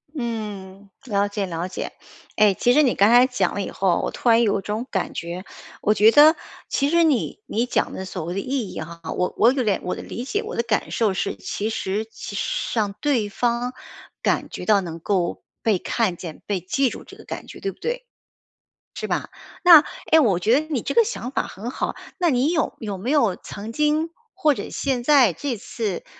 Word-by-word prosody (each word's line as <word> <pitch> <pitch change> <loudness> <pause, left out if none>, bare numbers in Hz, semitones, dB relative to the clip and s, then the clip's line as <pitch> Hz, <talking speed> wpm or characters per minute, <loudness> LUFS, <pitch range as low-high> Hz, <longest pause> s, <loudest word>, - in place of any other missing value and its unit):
嗯， 205 -5 -5
了 205 -3 +1
解 205 -1 -2
了 170 +1 -3
解， - - -5 0.4
诶， 210 -2 +5
其 245 +5 +2
实 300 +3 +5
你 250 - +3
刚 200 +2 +4
才 245 +2 +7
讲 225 -8 0
了 200 - -1
以 - - -5
后， 190 -3 +1
我 - - -1
突 245 - -1
然 230 +1 +6
有 200 -2 +1
种 210 +4 -3
感 190 - -2
觉， 170 +2 -5 0.4
我 210 - +3
觉 215 +2 +6
得 300 +5 +8 0.3
其 280 +1 +1
实 340 +1 +4
你 280 -9 +1
你 230 +3 0
讲 - - 0
的 190 - -5
所 185 -2 -5
谓 175 +3 -4
的 195 - -1
意 255 -3 -2
义 - - -6
哈， 170 +1 -8 0.2
我 180 - 0
我 235 +3 +6
有 265 -2 0
点 205 -3 +1
我 180 - -2
的 - - -8
理 240 - -6
解， 410 - -2
我 435 - -6
的 - - +1
感 230 -2 -1
受 215 -4 +1
是， - - -2
其 200 - -3
实 205 +1 -2 0.7
让 205 -3 0
对 255 -8 +1
方 240 +3 -1 0.5
感 - - 0
觉 - - -6
到 205 -2 +5
能 165 -2 -6
够 180 -1 -1 0.2
被 210 -5 +2
看 210 -4 0
见、 165 -2 -9
被 200 -3 -1
记 255 +9 +1
住 - - -8
这 - - -14
个 - - -13
感 - - -7
觉， - - -10
对 395 - -2
不 - - -21
对？ - - -3 1.4
是 - - -16
吧？ - - -18
那， 330 -4 +10 0.3
诶， 320 0 +7
我 200 - +3
觉 225 +10 +3
得 310 - -7
你 275 -7 -1
这 - - -2
个 470 - +7
想 415 - -4
法 - - -1
很 225 +6 -7
好， - - -3 0.2
那 355 - +2
你 270 +2 +2
有 320 - 0
有 205 -4 -5
没 225 +8 -3
有 235 -11 +3
曾 210 +3 -8
经 300 +4 +1 0.2
或 310 -6 +3
者 - - -6
现 260 -4 -1
在 260 - +5
这 245 - -3
次， 210 -2 -4
225 Hz, 230 characters per minute, -23 LUFS, 195-270 Hz, 1.4 s, 那